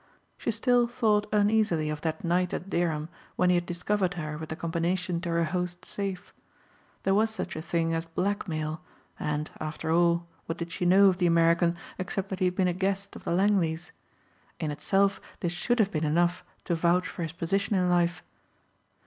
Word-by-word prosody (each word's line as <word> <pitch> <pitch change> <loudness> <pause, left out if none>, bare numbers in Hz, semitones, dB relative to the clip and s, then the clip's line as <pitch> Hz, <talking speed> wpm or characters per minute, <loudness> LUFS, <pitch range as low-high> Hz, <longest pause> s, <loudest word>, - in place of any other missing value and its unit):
She - - -4
still 240 +2 +3
thought 220 -4 +1
uneasily 205 -7 +2
of 150 -1 -5
that 160 -1 -3
night 175 +1 +1
at 190 - -6
Dereham 160 -3 0 0.3
when 180 - +3
he - - +4
had 175 0 0
discovered 185 +2 0
her 155 -3 -4
with 160 +1 -7
the 160 - -3
combination 170 +1 -1
to 175 - -4
her 170 0 +2
host's 180 +1 -3
safe. 195 -3 -4 0.7
There 195 - +2
was 215 +3 +3
such 220 - -5
a 155 - -4
thing 165 0 0
as 165 0 -1
blackmail 165 -3 -2 0.4
and, 150 0 -2
after 155 +1 -3
all 170 0 +3 0.2
what 165 - -3
did 170 0 -5
she 180 0 -1
know 195 +3 +7
of 185 - 0
the 175 - +3
American 170 +1 +3 0.2
except 190 +1 -3
that 190 - -4
he 185 - +2
had 180 0 +1
been 185 -1 +2
a 180 - +1
guest 195 +2 -2
of - - -11
the - - -1
Langleys. 175 -3 +1 0.7
In 155 -3 -1
itself 195 +6 +1 0.2
this 175 - 0
should 240 +7 0
have 210 -3 +3
been 155 -1 -1
enough 175 +4 +2 0.2
to 175 - -1
vouch 170 +2 +2
for - - -7
his 165 -2 -2
position 195 +5 0
in 180 -1 +2
life. 175 -2 +2
175 Hz, 195 wpm, -28 LUFS, 165-195 Hz, 0.7 s, know